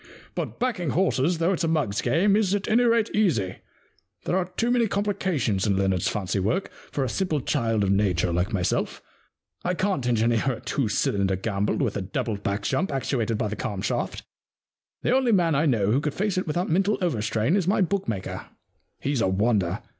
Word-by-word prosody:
But - - -4
backing 225 - -1
horses, 170 0 +1
though 170 +4 +2
it*s 180 - -2
a - - +2
mug's 145 -11 0
game, 175 +11 +3
is, 205 -2 +2
at 200 - -3
any 230 +3 +4
rate, 230 -1 +2
easy. 120 - +1 0.7
There - - 0
are 185 -1 +1
too 235 +1 +1
many 240 -2 +3
complications 185 - 0
in 100 -2 +2
Leonard's 95 -2 +1
fancy 100 -1 -1
work 110 - -1 0.2
for 140 - -1
a - - 0
simple 155 - -1
child 115 -6 0
of 95 - +1
Nature 90 -4 +1
like 90 +5 0
myself. 95 -5 -1 0.6
I 180 +1 0
can't 185 -9 0
engineer 120 +2 +2
a 115 - -7
two 135 -6 -1
cylinder 100 -2 +1
gamble 100 +1 -1
with 120 -8 0
a - - -2
double 105 +3 -2
back 100 0 -2
jump 190 - 0
actuated 120 -5 -1
by 110 - -1
the 105 - -4
cam 105 -6 -4
shaft. - - -2 0.8
The 250 - +3
only 260 -3 +3
man 175 -6 +3
I 150 +3 +2
know 105 -6 +2
who 130 +5 +2
could 150 -1 -2
face 205 0 0
it 185 -1 -1
without 175 +4 -1
mental 195 +5 +2
overstrain 115 - 0
is 190 -4 0
my 195 - +3
book 195 +1 0
maker. 100 -4 -4 0.5
He's 140 -3 -1
a - - +3
wonder. 100 -1 +1
135 Hz, 200 wpm, -25 LUFS, -, 0.8 s, any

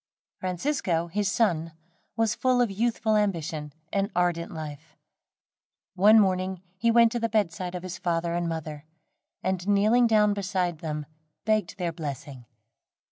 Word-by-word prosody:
Francisco, 180 - -1
his 205 +3 0
son, 165 -8 +1 0.4
was 225 -1 +2
full 255 -1 +2
of 240 -4 +2
youthful 220 +1 +1
ambition 165 -7 -1 0.2
and 200 0 +1
ardent 175 -1 0
life. 155 -1 -8 1.0
One 210 +4 +6
morning 185 -2 0
he 230 +5 +1
went 230 0 +6
to 240 - -1
the 230 0 0
bedside 185 -4 -1
of 180 - -5
his 185 -1 -6
father 170 -1 -1
and 175 0 -1
mother, 155 -2 -5 0.6
and 190 0 -1
kneeling 215 +4 +4
down 210 -2 +4
beside 185 -4 -1
them 150 -2 -4 0.4
begged 215 -5 0
their 175 -3 -1
blessing. 140 -5 -7
185 Hz, 140 wpm, -27 LUFS, 165-215 Hz, 1.0 s, One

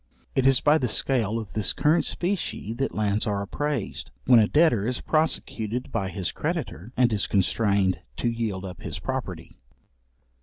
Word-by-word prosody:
It 135 0 +3
is 135 -2 +4
by 150 +2 +4
the 125 - 0
scale 115 -2 0
of 110 -3 -6
this 105 -3 +1
current 155 +3 +2
specie 175 - -2
that 135 +3 -2
lands 105 +1 0
are 100 -1 0
appraised, 140 +2 -3 0.2
when 125 -2 +7
a 105 - +4
debtor 135 -9 +3
is 125 0 0
prosecuted 125 -6 -1
by 95 -1 -1
his 95 -2 -3
creditor, 105 +8 -4
and 120 -3 +4
is 105 - 0
constrained 100 -1 +2 0.2
to 120 - -1
yield 110 -5 -2
up 90 -3 -8
his - - -5
property. - - -5
115 Hz, 165 wpm, -26 LUFS, 100-135 Hz, 0.2 s, when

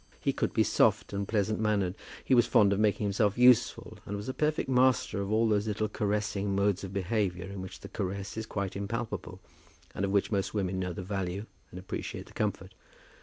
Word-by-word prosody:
He - - 0
could - - -1
be - - +3
soft - - +2
and 100 0 -2
pleasant 110 -1 0
mannered. 105 -4 +1 0.3
He - - +2
was 120 -2 +5
fond 100 -1 +5
of 100 - -1
making 105 0 +2
himself 100 +1 +1
useful, 125 -1 +4
and 100 - -4
was 105 - -7
a 130 - -2
perfect 155 +2 0
master 130 -5 +2
of 100 +1 -3
all 110 +1 +3
those 105 0 +1
little 110 0 0
caressing 105 -2 -1
modes 100 -1 +1
of 95 - -5
behaviour 95 -2 -1
in 100 0 -6
which 95 - -9
the - - -8
caress 100 +2 -4
is 110 0 -4
quite 100 -2 -3
impalpable, 110 +4 -4 0.5
and - - -3
of 100 - +1
which 100 +2 +1
most 100 0 -1
women 95 -2 -1
know 90 -1 -2
the 90 - -6
value 95 +1 -3 0.2
and 90 - -9
appreciate 95 - -5
the - - -17
comfort. - - -2
100 Hz, 210 wpm, -30 LUFS, 95-110 Hz, 0.5 s, was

